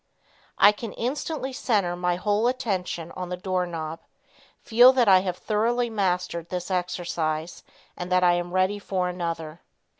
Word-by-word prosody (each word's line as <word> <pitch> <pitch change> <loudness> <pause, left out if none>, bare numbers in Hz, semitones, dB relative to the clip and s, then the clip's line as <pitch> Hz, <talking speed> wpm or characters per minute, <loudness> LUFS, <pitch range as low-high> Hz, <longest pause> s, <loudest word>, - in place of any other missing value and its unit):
"I 205 - +7
can 215 +1 -7
instantly 270 +2 -3
center 205 -9 0
my 180 0 0
whole 205 +5 +1
attention 190 -9 -2
on 180 -1 -6
the 180 - -4
door 185 -1 -1
knob. 160 -1 -5 0.6
Feel 245 +3 +6
that 250 -3 +3
I 190 -2 +7
have 185 -1 -3
thoroughly 235 +3 0
mastered 180 -4 -1
this 180 +1 -4
exercise 175 -3 -2 0.3
and 180 +1 -6
that 180 0 +3
I 175 -1 +5
am 175 0 -2
ready 185 +3 +1
for 185 -3 -2
another." 165 -2 -5
185 Hz, 155 wpm, -25 LUFS, 175-210 Hz, 0.6 s, I